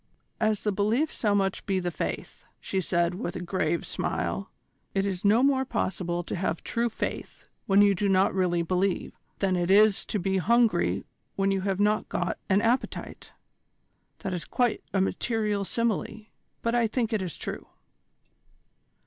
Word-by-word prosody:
"As 215 -2 +1
the 210 - +1
belief 220 +10 +1
so 210 -3 +1
must 195 -1 0
be 195 -2 +1
the 175 -1 -2
faith," - - -5 0.2
she 190 - -2
said 170 +1 +1
with 180 -2 -4
a - - -3
grave 170 -2 -1
smile. - - -2 0.5
"It 195 0 +2
is 190 -3 -3
no 215 +5 +5
more 270 -1 +3
possible 175 -8 -2
to - - -4
have 175 -2 -2
true 235 +1 0
faith 220 - -5 0.2
when 200 +1 +6
you 200 -1 +5
do 200 +2 0
not 190 0 +3
really 180 -2 +1
believe 185 +2 0 0.2
than 190 -2 +1
it 175 0 0
is 205 +1 +5
to - - -1
be 190 0 0
hungry 235 +4 +2 0.3
when 195 0 +1
you 195 -1 0
have 195 0 -1
not 210 +1 +2
got 175 - -2
an 195 +1 +4
appetite. 240 +3 -1 0.9
That 190 - -3
is 175 - -2
quite 245 -3 0
a 195 - +2
material 210 0 0
simile; 220 0 -2 0.4
but 230 - +1
I 240 -1 +3
think 230 0 -1
it 215 - +1
is 180 -5 -4
true." - - -6
195 Hz, 170 wpm, -27 LUFS, 185-220 Hz, 0.9 s, when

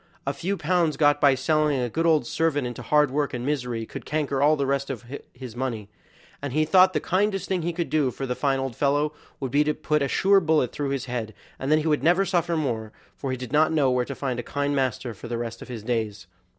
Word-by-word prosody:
a 140 - -1
few 180 +8 -2
pounds 170 -1 +1
got 145 -1 +3
by 140 -2 +6
selling 150 +1 +1
a 125 - 0
good 165 +9 0
old 155 -6 +3
servant 145 -1 0
into 120 0 -5
hard 150 +3 +3
work 145 -2 -1
and 120 0 -4
misery 125 -6 -2
would - - -6
canker 145 -3 -1
all 150 +2 +5
the 140 -2 -1
rest 140 0 -1
of 125 -3 -5 0.3
his 125 -3 -10
money, 120 -5 -3 0.5
and 140 -3 -4
he 155 +1 +2
thought 185 +3 +5
the 150 - +1
kindest 195 +3 0
thing 185 -2 0
he 170 +2 -1
could 170 0 -3
do 150 -4 +2
for 135 +2 -5
the 125 - -1
fine 135 +1 0
old 135 -3 -3
fellow 145 +3 +1 0.3
would 135 -3 -4
be 145 +3 +4
to 150 0 0
put 150 -1 0
a 140 - +1
sure 195 +8 +4
bullet 155 -7 +2
through 145 -2 -3
his 135 -2 -2
head, 115 -4 -4 0.2
and 135 +2 -2
then 155 - +6
he 155 +1 -1
would 150 -2 +2
never 180 +4 +3
suffer 175 -2 0
more; 115 -8 -2 0.2
for 135 - -5
he 130 - -2
did 125 -1 -7
not 155 +2 +4
know 145 -5 +3
where 125 0 +2
to 140 - -6
find 130 -3 -3
a - - -1
kind 145 +3 -2
master 130 -2 -1
for 110 +4 -10
the 120 0 -3
rest 115 -1 -5
of - - -9
his 120 -4 -7
days. 110 -5 -2
140 Hz, 255 wpm, -25 LUFS, 125-155 Hz, 0.5 s, by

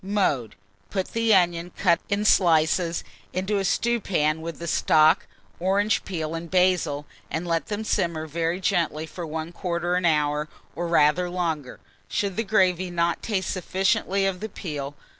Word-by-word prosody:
Mode. 185 - 0 0.3
Put 190 -2 -2
the 230 0 +1
onion, 175 -1 +1
cut 170 -3 +3
in 200 +1 0
slices, 170 -2 +3 0.3
into 190 +3 0
a - - -1
stewpan 180 -8 +1
with 165 -1 -6
the 170 - -7
stock, 155 -1 +4 0.3
orange 200 +4 +1
peel, 160 -4 -3
and 165 0 -5
basil, 180 -5 +2 0.2
and 160 +2 -3
let 165 -1 0
them 210 +1 -3
simmer 170 -6 -1
very 165 +3 -2
gently 170 -5 0
for 170 +1 -7
1/4 170 +3 -2
hour 150 -1 +1 0.3
or 175 0 -2
rather 170 +2 +3
longer, 165 -7 -3 0.3
should 200 -2 -1
the 225 - 0
gravy 185 -4 +2
not 170 -1 0
taste 195 -5 -1
sufficiently 195 +2 0
of 190 -2 -1
the 220 - -5
peel. 145 -7 -5
175 Hz, 150 wpm, -25 LUFS, 160-190 Hz, 0.3 s, stock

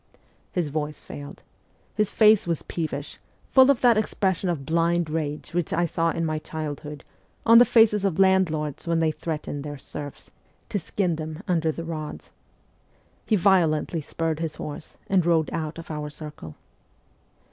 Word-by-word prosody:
' - - -37
His 175 -5 -1
voice 150 0 -3
failed; 145 0 -10 0.5
his 210 -2 +1
face 215 -4 +5
was 170 -3 -1
peevish, 155 -3 -4 0.3
full 260 0 +7
of 275 -4 +3
that 240 -3 +5
expression 190 -3 0
of 150 -6 -2
blind 170 +1 +1
rage 155 -1 -3
which 175 -2 -1
I 175 +1 +2
saw 165 0 0
in 165 0 -1
my 155 -1 -1
childhood 150 -2 -6 0.4
on 230 +1 +8
the 245 - +8
faces 220 -4 +4
of 195 -5 0
landlords 175 -6 +2
when 165 -1 +2
they 160 -1 +2
threatened 150 -3 -5
their 145 -1 -6
serfs 145 +1 -8 0.4
'to 205 - -1
skin 175 -1 -1
them 155 +3 -6
under 165 -3 +1
the 165 - -6
rods.' 155 -2 -6 1.0
He 220 - +3
violently 170 -4 +2
spurred 160 +1 -2
his 160 -2 -3
horse, 150 +1 -8
and 190 -2 +3
rode 165 -2 +2
out 160 -1 -3
of 165 -1 -8
our 150 -1 -4
circle. 150 - -9
165 Hz, 165 wpm, -25 LUFS, 150-185 Hz, 1.0 s, on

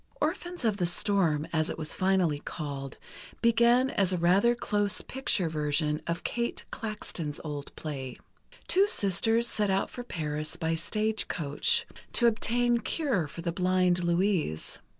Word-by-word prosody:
"Orphans 350 0 -2
of 215 -3 +2
the 175 -3 +1
Storm," 175 -5 +2
as 155 -1 +1
it - - -4
was 155 -1 -3
finally 185 -6 +1
called, 140 -4 -6 0.5
began 235 +3 +4
as 195 -2 +1
a 180 - +1
rather 190 +8 +4
close 205 -3 0
picture 235 -8 0
version 150 0 -1
of 170 +1 -2
Kate 235 0 -2
Klaxton's 185 -9 -5
old 145 -2 -6
play. 135 -5 -6 0.5
Two 390 +2 +4
sisters 225 - +2
set 210 -3 +1
out 190 0 0
for 245 - -6
Paris 155 -7 -4
by 165 -1 -1
stage 215 +6 -1
coach, 180 - +1 0.3
to 240 - +3
obtain 235 +1 +2
cure 235 - 0
for 165 +3 -8
the 170 - -1
blind 180 0 +2
Louise. 170 - 0
185 Hz, 150 wpm, -29 LUFS, 155-230 Hz, 0.5 s, began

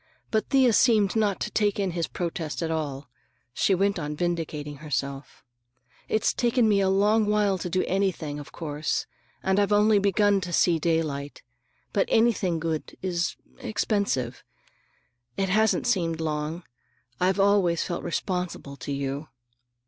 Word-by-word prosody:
But 220 -1 0
Thea 260 -4 +4
seemed 215 -4 +4
not 210 -3 +1
to - - -2
take 205 -1 +1
in 195 -2 0
his 170 -1 -2
protest 170 -2 -4
at 165 - -2
all. 145 -4 -3 0.5
She 190 - +2
went 195 0 +1
on 150 -1 -4
vindicating 155 -3 -3
herself. 140 -1 -4 0.7
"It's 215 - +1
taken 240 -1 +2
me 205 -2 +3
a 190 - +2
long 210 +3 +3
while 205 -2 +2
to 180 - -4
do 185 +2 +1
anything, 180 -6 -1
of 145 - -10
course, 150 -2 -2 0.4
and 190 +1 +2
I've 205 0 +2
only 210 0 +5
begun 200 0 +3
to 180 -1 -5
see 170 0 +3
daylight. 150 -3 -2 0.5
But 200 - +2
anything 215 -7 +2
good 160 -1 -3
is—expensive. 180 - -2 0.9
It 195 -1 0
hasn't 220 +4 +2
seemed 170 -9 0
long. 155 +2 -3 0.6
I've 185 +2 +2
always 195 -4 +3
felt 175 - -4
responsible 180 -6 -3
to 140 - -6
you." 140 +2 -3
180 Hz, 145 wpm, -26 LUFS, 155-205 Hz, 0.9 s, only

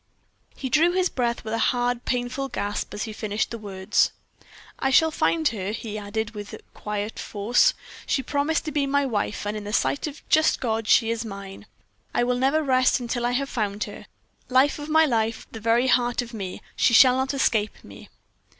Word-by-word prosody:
He 265 - -4
drew 320 +6 +3
his 370 0 +2
breath 240 -2 -1
with 220 0 -5
a 230 - 0
hard, 245 0 0
painful 250 +2 -2
gasp 205 -4 -3
as 205 - -4
he 220 - -5
finished 210 0 -2
the 230 - -5
words. 190 -3 0 0.7
"I 270 - +1
shall 320 +5 +4
find 315 0 +1
her," 200 -3 -4
he 220 -1 -6
added, 215 +1 -3
with 205 -2 -8 0.2
quiet 210 +1 -4
force. 235 - +2 0.3
"She 265 - 0
promised 290 +5 0
to 305 - -3
be 285 -1 0
my 285 +1 +2
wife, 210 -4 -2
and 205 +1 -2
in 210 - -5
the 205 - -6
sight 285 +7 0
of 290 - -6
the - - -16
just 315 0 +3
God 225 -3 -2
she 225 0 +4
is 230 0 -2
mine. 195 -3 -9 0.5
I - - +3
will 245 0 0
never 280 +4 +2
rest 255 -1 +3
until 240 0 -2
I 245 - -1
have 275 +2 0
found 210 -4 -2
her, 205 -5 -9 0.4
life 265 +4 +3
of 295 +1 -7
my 315 +1 +5
life, 225 -4 -1
the 225 - -7
very 230 +3 +2
heart 245 -1 +2
of 235 0 -11
me. 195 -4 -6
She 235 - +3
shall 255 +1 +7
not 265 +2 -1
escape 215 -5 0
me." - - -13
240 Hz, 205 wpm, -24 LUFS, 215-270 Hz, 0.7 s, shall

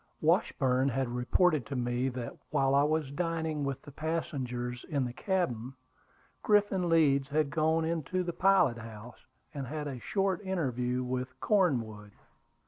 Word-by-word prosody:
Washburn 130 +1 +2
had 135 0 -1
reported 135 +5 +2
to 140 - -4
me 125 +1 0
that, 125 -2 -6
while 135 -2 +2
I 140 - +5
was 150 -1 0
dining 160 -1 -2
with 140 -1 -3
the 145 - -11
passengers 130 -6 -3
in 140 -5 -1
the 120 - -5
cabin, 135 - -2 0.7
Griffin 205 -3 +2
Leeds 140 -5 +4
had 150 0 0
gone 160 0 +2
into 165 +2 -1
the 175 -1 -3
pilot 185 -12 +3
house 115 +1 -10 0.3
and 140 -3 -5
had 150 +2 -4
a 135 -3 -5
short 195 - 0
interview 125 - -1
with 130 +1 -4
Cornwood. 115 - 0
140 Hz, 145 wpm, -30 LUFS, 125-165 Hz, 0.7 s, I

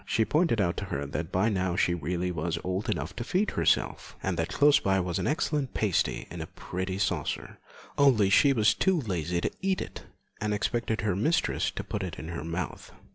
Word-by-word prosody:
She 110 +2 +1
pointed 155 -6 +2
out 85 -4 +1
to - - -3
her 70 +1 -3
that 80 +4 -4
by 95 +5 +2
now 95 -4 0
she 90 - +2
really 90 +2 -2
was 85 0 -2
old 95 +3 -2
enough - - -2
to 120 - -2
feed 185 - 0
herself, - - 0
and 95 -1 0
that 80 0 -1
close 145 0 +5
by 95 -1 +2
was 90 -2 -1
an - - -1
excellent 150 -2 -1
pasty 100 -6 0
in 85 -1 -6
a 80 - -5
pretty 95 +1 -4
saucer, 100 - -2 0.4
only 115 -9 +5
she 140 +7 +6
was 110 -5 +4
too 190 -3 +2
lazy 90 - -2
to - - -1
eat 190 0 +1
it, - - -7 0.4
and 105 0 0
expected 115 +2 -1
her 105 -4 0
mistress 155 - +1
to - - -5
put 105 - -4
it 90 -4 -5
in 80 - -7
her 85 -2 -4
mouth. 85 +3 -5
95 Hz, 210 wpm, -28 LUFS, 85-120 Hz, 0.4 s, she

